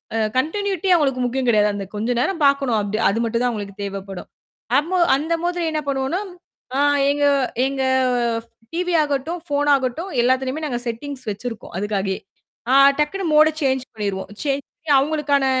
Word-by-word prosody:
அ - - +1 0.2
continuity 385 +5 -1
அவங்களுக்கு 270 -5 +1
முக்கியம் 255 +1 -1
கெடையாது. 210 -2 +4
அந்தக் 200 0 -6
கொஞ்ச 220 +4 -2
நேரம் 335 +4 -1
பாக்கணும். 275 -5 +3
அப்படி 205 +1 -2
அது 225 +3 -1
மட்டும் 230 +1 -1
தான் 250 - +2
அவங்களுக்கு 200 -3 -6
தேவைப்படும். 195 -1 -6 0.5
அம்மோ 340 +6 0 0.2
அந்த 315 +4 -1
மாதிரி 350 -1 -1
என்ன 305 -1 -1
பண்ணுவோம்ன்னா 270 +6 -1 0.6
ஆ - - +1 0.3
எங்க 290 0 +1 0.4
எங்க 270 0 -1 0.6
ஃப் - - -34 0.2
டிவி 355 +1 -1
ஆகட்டும், 295 +4 -2
ஃபோன் 290 -1 0
ஆகட்டும் 270 +8 -3
எல்லாத்துலயுமே 260 +4 0
நாங்க 245 -4 -2
செட்டிங்ஸ் 255 +2 -5
வச்சிருக்கோம் 225 +2 -7
அதுக்காகயே. 195 -2 -2 0.5
ஆ - - +4 0.3
டக்குன்னு 350 +5 0
மோட 305 +1 +7
சேஞ்ச் 265 -2 +1
பண்ணீருவோம். 200 -3 -4
சேஞ்ச் 280 -1 -1
பண்ணி 310 -2 -5
அவங்களுக்கான 285 -1 +1
270 Hz, 160 wpm, -21 LUFS, 225-305 Hz, 0.6 s, மோட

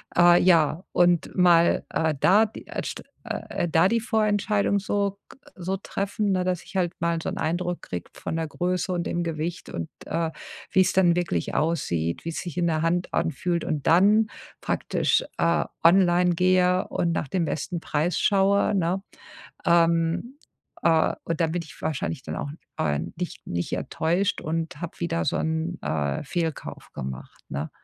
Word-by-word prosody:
Äh, 175 0 +7
ja, 165 -1 +3
und 175 -1 +2
mal, 175 -2 +4
äh, 160 -1 +1
da 205 +8 +5
die, - - -10
äh, - - -4
st - - -5 0.2
äh, 175 - -3
da 165 +3 +4
die 230 +3 +2
Vorentscheidung 210 -2 +1
so 200 0 -1
g - - -15 0.2
so 185 +1 -2
treffen, 200 +1 -2
ne, 185 -1 +1
dass 180 -1 -1
ich - - -15
halt 175 -2 +1
mal 170 0 0
so - - -3
'n - - -5
Eindruck 175 +2 -1
kriege 90 - -6
von - - -5
der 165 0 -1
Größe 180 +3 -1
und 175 -1 -2
dem 175 - -1
Gewicht 165 +1 -4
und, 85 -1 -5 0.2
äh, 165 -1 -1 0.4
wie's 190 -1 +4
dann 175 -2 +4
wirklich 170 - -1
aussieht, 85 - 0
wie's 165 -1 -3
sich 175 -3 -7
in 175 -1 +2
der 160 -2 +1
Hand 175 +2 0
anfühlt 170 +3 -1
und 150 -3 -2
dann 205 +6 +5 0.3
praktisch, - - +1 0.2
äh, 170 0 +3 0.2
online 175 0 +5
gehe 185 +1 +3
und 170 - 0
nach 160 - -1
dem 175 +2 0
besten 165 +3 -3
Preis 165 +2 -1
schaue, 200 +1 +3
ne? 185 +1 0 0.7
Ähm, 170 - +2 0.4
äh, 160 -1 +3
und 165 0 -3
dann 160 - +1
bin 175 - -1
ich 160 - -13
wahrscheinlich 155 -1 -2
dann - - -5
auch, 145 - -4 0.3
äh, 75 -1 +1 0.2
nicht 175 +1 -6
nicht 85 0 -3
enttäuscht 175 +5 0
und 160 0 -3
habe 175 - -6
wieder 125 - -1
so - - +1
'n, 160 +2 -1
äh, 75 -2 -1
Fehlkauf 160 +1 -4
gemacht, 65 -1 -7
ne? 70 +3 -3
170 Hz, 170 wpm, -25 LUFS, 160-185 Hz, 0.7 s, Äh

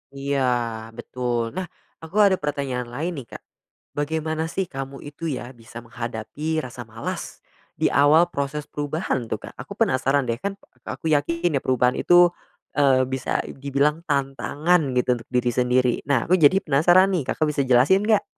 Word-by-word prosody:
Iya 140 0 -1 0.6
betul. 120 -1 -3
Nah, 185 +5 -4 0.3
aku 160 +3 -12
ada 190 -2 +4
pertanyaan 140 -4 -3
lain 145 +9 -3
nih, 125 - -11
Kak. - - -10 0.5
Bagaimana 160 +1 -1
sih 190 +3 -2
kamu 135 0 -7
itu 150 +3 -6
ya 125 -4 -4
bisa 115 -1 -12
menghadapi 120 +7 -4
rasa 125 -1 -8
malas 115 0 -6 0.3
di - - +1
awal 155 +5 +5
proses 140 0 -3
perubahan 145 -3 -2
tuh, - - -1
Kak? - - -9
Aku - - -8
penasaran 135 +2 +2
deh 115 0 -1
kan 200 +6 -3 0.3
aku 160 - -3
yakin 165 +2 +1
ya - - -23
perubahan 125 -1 +2
itu, 175 0 +6 0.5
eee, 135 -3 +4
bisa 130 -1 -1
dibilang 140 +3 0
tantangan 145 +1 0
gitu 125 0 +2
untuk 115 - -14
diri 125 -1 +1
sendiri. 125 0 +2
Nah, 140 -5 +2
aku 185 - +6
jadi 150 +3 +6
penasaran 175 +6 +4
nih 180 -6 0
Kakak - - -1
bisa 145 -2 0
jelasin 130 +11 +4
nggak? 215 -2 +4
140 Hz, 165 wpm, -23 LUFS, 125-160 Hz, 0.6 s, itu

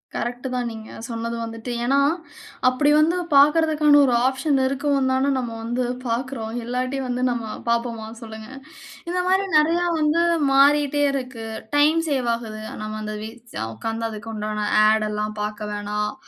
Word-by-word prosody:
Correct 245 +2 -3
தான் 250 -1 -1
நீங்க 220 -1 -9 0.2
சொன்னது 230 0 -4
வந்துட்டு. 225 +1 -6
ஏனா, 275 +3 +3 0.7
அப்படி 255 +4 +3
வந்து 315 +3 +3 0.2
பார்க்கிறதற்கான 300 0 +5
ஒரு 250 - +2
ஆப்ஷன் 270 +2 +1
இருக்கவும் 275 0 +1
தான, 265 +2 +2
நம்ம 245 -2 -3
வந்து 240 +2 -2 0.2
பார்க்கிறோம், 235 -1 -3
இல்லாட்டி 255 +3 -2
வந்து 250 0 -2
நம்ம 235 -2 -3 0.2
பார்ப்போமா? 235 -1 -1 0.2
சொல்லுங்க. 220 0 -9 0.6
இந்த 360 - -1
மாதிரி 380 +1 +3
நிறைய 325 +3 +3 0.2
வந்து 305 +2 +2 0.3
மாறிட்டே 290 +1 +4
இருக்கு, 255 -4 -5 0.3
டைம் 305 +3 +4
சேவ் 260 -4 0
ஆகுது. 215 -2 -7 0.2
நம்ம 215 0 -5
அந்த 215 0 -4
வீ 220 - -5 0.4
உட்கார்ந்து 225 - -3
அதுக்கு 220 +1 -7
உண்டான 210 0 -3 0.3
ஆட் 215 0 +3
எல்லாம் 210 0 -3
பார்க்க 210 0 -4
வேணாம், 210 +1 -2
245 Hz, 145 wpm, -23 LUFS, 220-280 Hz, 0.7 s, பார்க்கிறதற்கான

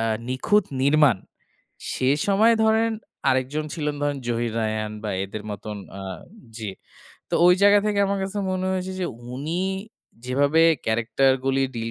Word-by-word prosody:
আ - - 0 0.3
নিখুঁত 185 +10 +2 0.2
নির্মাণ। 140 -4 +5 0.8
সে 130 - 0 0.2
সময়ে 215 +4 +4
ধরেন 220 +1 +3 0.4
আরেকজন 130 +4 0
ছিলেন 150 -2 -2
ধরেন 145 -1 0
জহির 120 -1 -1
রায়হান 110 -1 -2
বা 105 - -3
এদের 105 +2 -7
মতন, 105 +1 -6 0.2
আ - - -7 0.6
জি। 110 -4 -4 0.6
তো - - -2
ওই 180 - +7
জায়গা 205 0 +7
থেকে 205 -1 0
আমার 200 0 -1
কাছে 195 +2 -3
মনে 185 0 -1
হয়েছে 185 0 -3
যে, 180 - 0 0.3
উনি 160 +7 -3 0.6
যেভাবে 140 +5 +2 0.3
ক্যারেক্টারগুলি 135 +4 +2
ডিল 115 0 -3
140 Hz, 145 wpm, -24 LUFS, 115-185 Hz, 0.8 s, ওই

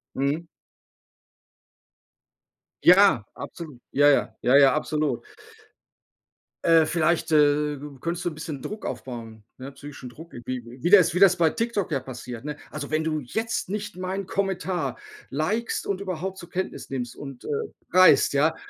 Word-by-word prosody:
Mhm. 145 +5 -1 2.4
Ja, 180 - +7
absolut. 155 -8 -9
Ja, 145 +1 +4
ja. 140 - +2
ja, 125 +3 +4
ja, 140 -1 +7
absolut. 155 - -1 1.4
Äh, 165 -1 +6
vielleicht, 165 0 +1
äh, 150 -1 +3 0.2
könntest 170 +3 -3
du 175 - 0
'n 155 - -10
bisschen 155 -3 -6
Druck 210 +9 -6
aufbauen, 115 -4 -7
ne, 135 +2 -9
psychischen 140 -3 -10
Druck. 160 +7 -12
Irgendw 120 0 -7
wie 175 - +1
das 185 -4 +6
wie 180 - 0
das 185 -2 +7
bei 165 -2 +3
TikTok 225 -5 -2
ja 135 - +1
passiert, 125 0 -8
ne? 150 -1 -4 0.2
„Also, 145 -2 -5
wenn 155 +1 0
du 155 -1 -1
jetzt 220 - -3
nicht 205 -2 -5
meinen 185 +1 -4
Kommentar 185 -8 -2 0.3
likest 200 - -1
und 195 -1 -1
überhaupt 190 0 -4
zur 175 -2 -10
Kenntnis 185 +1 -4
nimmst 125 -3 -4
und, 135 -3 -9
äh, - - -7 0.4
reist, 185 -6 +6
ja, 155 +3 +2
155 Hz, 150 wpm, -25 LUFS, 135-185 Hz, 2.4 s, Ja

